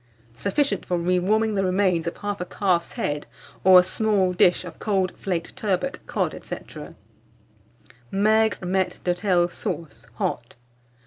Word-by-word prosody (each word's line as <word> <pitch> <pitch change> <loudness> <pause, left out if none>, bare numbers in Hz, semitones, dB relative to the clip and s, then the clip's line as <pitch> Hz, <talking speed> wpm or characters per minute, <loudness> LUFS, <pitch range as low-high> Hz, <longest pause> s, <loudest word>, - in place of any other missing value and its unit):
Sufficient 200 - 0
for 180 - -1
re 180 +1 +1
warming 215 +4 +1
the 195 -1 +1
remains 185 -3 +1
of 170 - -3
1/2 205 -3 -4
calf's 180 -4 0
head, 145 0 -3 0.4
or 185 -1 +9
a - - +4
small 195 -1 +1
dish 180 0 +3
of 170 -2 -10
cold 190 -3 0
flaked 175 -4 -4
turbot, 215 +8 -1
cod, - - -1
&c. - - -4 1.5
MAIGRE 215 0 +2
MAITRE 185 0 0
D'HOTEL 180 -1 +2
SAUCE 120 -9 -6
(HOT). 120 0 -3
185 Hz, 135 wpm, -24 LUFS, 175-205 Hz, 1.5 s, or